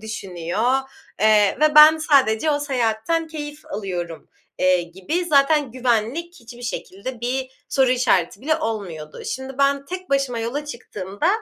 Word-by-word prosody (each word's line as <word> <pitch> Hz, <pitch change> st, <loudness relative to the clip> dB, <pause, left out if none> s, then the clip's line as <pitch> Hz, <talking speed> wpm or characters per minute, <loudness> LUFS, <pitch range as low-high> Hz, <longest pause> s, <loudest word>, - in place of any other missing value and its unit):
düşünüyor, 200 Hz, +1 st, -2 dB, 0.5 s
eee, 210 Hz, -1 st, +4 dB
ve 305 Hz, -1 st, +4 dB
ben 305 Hz, +1 st, +9 dB
sadece 280 Hz, -3 st, +3 dB
o 290 Hz, -1 st, 0 dB
seyahatten 260 Hz, +4 st, 0 dB
keyif 300 Hz, -1 st, -8 dB
alıyorum, 175 Hz, -5 st, -5 dB, 0.3 s
eee, 185 Hz, -1 st, +3 dB
gibi 190 Hz, -, -3 dB
zaten 290 Hz, -2 st, +3 dB
güvenlik 255 Hz, +7 st, -1 dB
hiçbir 235 Hz, +1 st, -12 dB
şekilde 235 Hz, +1 st, -6 dB
bir 260 Hz, +2 st, -2 dB, 0.2 s
soru 265 Hz, -2 st, +2 dB
işareti 215 Hz, -7 st, +1 dB
bile 310 Hz, +3 st, +1 dB
olmuyordu. 190 Hz, -, -5 dB
Şimdi 265 Hz, 0 st, -5 dB
ben 280 Hz, 0 st, +2 dB
tek 370 Hz, -1 st, -7 dB
başıma 275 Hz, -4 st, 0 dB
yola 240 Hz, +6 st, -3 dB
çıktığımda 210 Hz, -, -4 dB
250 Hz, 135 wpm, -22 LUFS, 210-295 Hz, 0.5 s, ben